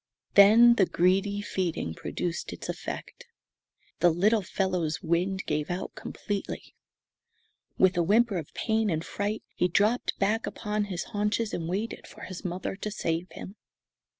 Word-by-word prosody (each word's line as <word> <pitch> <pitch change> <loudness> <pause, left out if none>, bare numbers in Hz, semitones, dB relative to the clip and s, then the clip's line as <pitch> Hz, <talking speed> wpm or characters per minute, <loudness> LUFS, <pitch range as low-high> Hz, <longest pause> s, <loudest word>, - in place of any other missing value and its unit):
Then 220 +4 +8
the 190 - +4
greedy 195 +3 +2
feeding 175 - -2
produced 170 - -4
its - - -7
effect. - - -6 0.7
The 175 - +5
little 205 +7 +3
fellow's 180 -3 -1
wind 180 +3 0
gave 150 0 -1
out 180 +2 -4
completely. 205 -1 -5 1.0
With 185 -1 +4
a - - +4
whimper 210 +3 +3
of 155 - -9
pain 220 -1 +1
and 160 -2 -1
fright 205 +2 -3
he 180 - +2
dropped 210 +7 +1
back 215 +3 +1
upon 210 -1 -2
his 185 -4 -4
haunches 210 +1 0
and 165 -1 -3
waited 205 +6 -3
for - - -14
his 185 0 -7
mother 180 +1 -3
to 210 - -4
save 170 -4 -2
him. 195 +3 -9
195 Hz, 150 wpm, -28 LUFS, 175-210 Hz, 1.0 s, Then